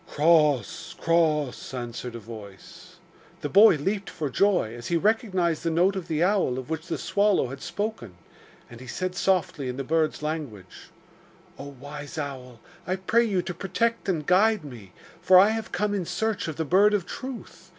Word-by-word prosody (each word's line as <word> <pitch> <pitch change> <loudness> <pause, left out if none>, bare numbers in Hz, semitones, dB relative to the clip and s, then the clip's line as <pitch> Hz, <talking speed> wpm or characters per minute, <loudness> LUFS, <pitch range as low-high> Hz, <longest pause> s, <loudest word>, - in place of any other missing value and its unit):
'Cross! 150 - +2
cross!' 155 -6 0
answered 120 0 -6
a - - -6
voice. 105 -4 -12 0.5
The 145 - -3
boy 205 +2 +7
leapt 195 +7 -2
for 150 -5 -4
joy 185 - +2
as 120 0 -8
he 170 - +1
recognised 190 -5 +1
the 165 - -1
note 180 +4 +2
of 190 -3 -5
the 160 +1 0
owl 185 -10 +1
of 130 +4 -7
which 160 +1 -4
the 170 - -2
swallow 200 -10 +1
had 135 +1 -8
spoken, 205 - -4 0.5
and 120 - -12
he 130 - -10
said 185 +7 -3
softly 180 -7 0
in 125 - -5
the 135 - -3
bird's 155 +1 0
language: 140 - -6 0.7
'Oh, 140 0 -8
wise 145 +2 -8
owl, 130 -5 -6 0.3
I 185 - 0
pray 215 +5 +2
you 190 -5 0
to 175 - -5
protect 215 +4 -1
and 160 -5 -1
guide 205 +3 +3
me, 115 -9 -11 0.3
for 185 - +6
I 195 +3 +7
have 220 0 -3
come 210 0 -1
in 195 -4 -2
search 220 -4 -2
of 160 - -4
the 160 - -2
Bird 200 +7 +4
of 190 -4 -1
Truth. 260 -3 -8
165 Hz, 180 wpm, -26 LUFS, 135-195 Hz, 0.7 s, boy